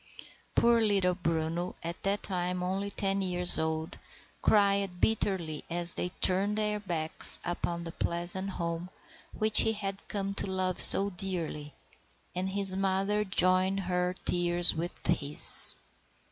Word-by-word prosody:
Poor 235 -1 +2
little 195 -4 +1
Bruno, 165 0 -4
at 170 +1 -7
that 200 +1 -3
time 180 -1 -4
only 195 +2 -4
ten 195 0 -3
years 180 -1 0
old, 160 0 -5 0.4
cried 200 -3 0
bitterly 185 -8 -2
as 175 0 +1
they 180 - -3
turned 195 +3 -1
their 210 -1 -2
backs 165 -6 0
upon 170 -1 -5
the 165 - -8
pleasant 175 +4 -3
home 170 -1 -6 0.5
which 215 0 +2
he 225 - 0
had 195 -2 -7
come 200 -1 -5
to 195 - -3
love 185 -1 -1
so 200 +1 +10
dearly, 170 -6 -6 0.6
and 185 +1 -4
his 195 -1 +4
mother 195 +2 -2
joined 190 0 +2
her 180 0 -3
tears 175 0 +2
with 170 +2 -7
his. 150 -3 +4
185 Hz, 135 wpm, -27 LUFS, 175-195 Hz, 0.6 s, so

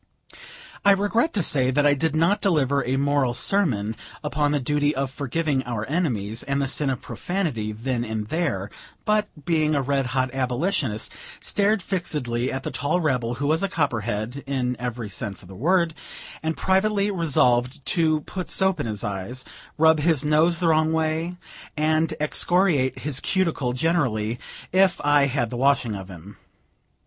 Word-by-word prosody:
I 200 - +7
regret 205 +9 +1
to 200 - +2
say 130 -5 +2
that 145 +3 +2
I 145 - +5
did 155 +2 0
not 170 +6 +2
deliver 140 -7 +2
a 130 +2 -1
moral 140 -3 +1
sermon 120 - +1 0.3
upon 145 +1 0
the 145 - +1
duty 145 +2 +1
of 135 0 -2
forgiving 145 +1 -1
our 115 -3 -3
enemies, 120 - -1
and 140 0 -1
the 140 - 0
sin 140 +1 0
of 130 - -3
profanity, 155 - -2
then 120 +3 -2
and 110 -2 -4
there; 105 - -1 0.3
but, 210 0 +2 0.2
being 155 -2 +2
a 140 - +2
red 135 -1 0
hot 130 0 -1
Abolitionist, 130 - -1 0.3
stared 205 -1 +1
fixedly 130 -10 -2
at 135 0 -4
the - - -4
tall 155 +5 0
rebel, 125 -7 0
who 145 - -3
was 155 +3 +2
a 195 - 0
copperhead, 120 - -2
in 125 -2 -1
every 120 -2 -4
sense 100 0 -4
of - - -14
the 95 - -11
word, 170 - +2 0.5
and 160 0 -2
privately 200 +1 +2
resolved 135 -6 +1
to 160 -3 +2
put 185 +4 -6
soap 190 -1 +2
in - - -2
his 105 -3 -3
eyes, 105 +6 -4 0.3
rub 160 0 +5
his 155 -2 +2
nose 155 +3 +3
the 170 -1 +1
wrong 155 0 +3
way, 160 +2 -1 0.4
and 155 +1 +1
excoriate 155 -2 +2
his 140 -3 0
cuticle 165 -10 0
generally, 125 -7 0 0.3
if 190 0 +3
I 145 -1 +4
had 125 -4 -1
the 120 - -4
washing 130 -3 +2
of 95 -1 -8
him. 95 +3 -11
145 Hz, 170 wpm, -24 LUFS, 125-165 Hz, 0.5 s, I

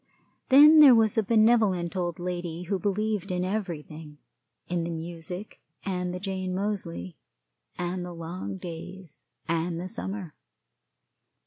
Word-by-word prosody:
Then 300 +4 +9
there 280 -5 +9
was 220 -2 +3
a 220 - +3
benevolent 215 -5 +3
old 175 -3 -2
lady 175 -1 -4
who 190 +2 -2
believed 205 +1 -1
in 180 0 -1
everything 160 -6 -5 0.5
in 175 -1 -1
the 170 - -3
music, 170 +4 -7 0.2
and 180 -2 -2
the 180 - -5
Jane 185 -1 -3
Moseley, 180 - -4 0.6
and 180 +1 -3
the 180 - -6
long 165 - -6
days, 175 - -9 0.3
and 165 +1 -1
the 180 - -4
summer. 190 -5 -5
180 Hz, 130 wpm, -27 LUFS, 170-200 Hz, 0.6 s, Then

